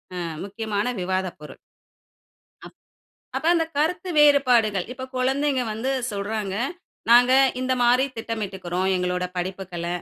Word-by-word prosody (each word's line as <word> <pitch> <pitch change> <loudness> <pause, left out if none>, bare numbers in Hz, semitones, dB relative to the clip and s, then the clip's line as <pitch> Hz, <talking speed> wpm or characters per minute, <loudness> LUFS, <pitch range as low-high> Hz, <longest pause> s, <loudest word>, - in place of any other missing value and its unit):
அ - - -4 0.3
முக்கியமான 205 0 -3 0.2
விவாத 185 +1 -1
பொருள் 150 - -11 1.1
அப் - - -12 0.6
அப்ப - - -3
அந்த 325 -1 +2
கருத்து 355 +4 0
வேறுபாடுகள். 245 -10 +4
இப்ப 260 +1 -7
குழந்தைங்க 265 +1 +1
வந்து 230 +5 -3 0.2
சொல்றாங்க, 200 -1 -3 0.6
"நாங்க 245 +2 +7 0.3
இந்த 255 0 0
மாரி 250 +3 +4
திட்டமிட்டுக்குறோம் 190 -5 -3
எங்களோட 180 0 -1
படிப்புக்கள. 180 -1 -4
220 Hz, 115 wpm, -24 LUFS, 190-260 Hz, 1.1 s, நாங்க